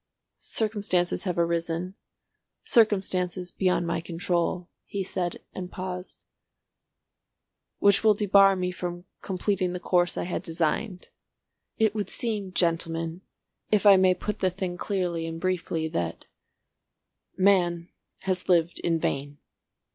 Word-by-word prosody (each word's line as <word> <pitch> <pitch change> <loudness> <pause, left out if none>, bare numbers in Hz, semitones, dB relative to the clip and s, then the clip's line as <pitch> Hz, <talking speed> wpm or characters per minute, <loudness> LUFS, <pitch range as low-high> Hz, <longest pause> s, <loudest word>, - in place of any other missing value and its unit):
"Circumstances 205 -6 -1
have 180 -2 -1
arisen—circumstances 180 +2 -1
beyond 180 -2 +1
my 170 0 -1
control," 175 +1 -1 0.2
he 200 -1 -4
said 180 -2 -3
and 180 -1 -6
paused, 180 0 -7 1.5
"which 200 +1 +4
will 215 -1 +6
debar 195 -1 +5
me 180 -1 -1
from 175 0 -5 0.2
completing 185 -1 -1
the 180 - -4
course 175 -1 +1
I - - -1
had 175 - -3
designed. 170 +4 -2 0.7
It 220 -2 +3
would 210 -2 -3
seem, 210 -5 -2
gentlemen, 165 -1 -1 0.5
if 210 -1 +2
I 200 -1 +9
may 185 -1 +4
put 210 +3 -4
the 185 - +2
thing 185 0 -4
clearly 175 -4 -2
and 165 0 -5
briefly, 170 -3 -1
that—Man 175 - -2 0.3
has 185 -1 -2
lived 170 -1 +3
in 165 -1 +1
vain." 145 -2 -2
180 Hz, 115 wpm, -27 LUFS, 170-195 Hz, 1.5 s, I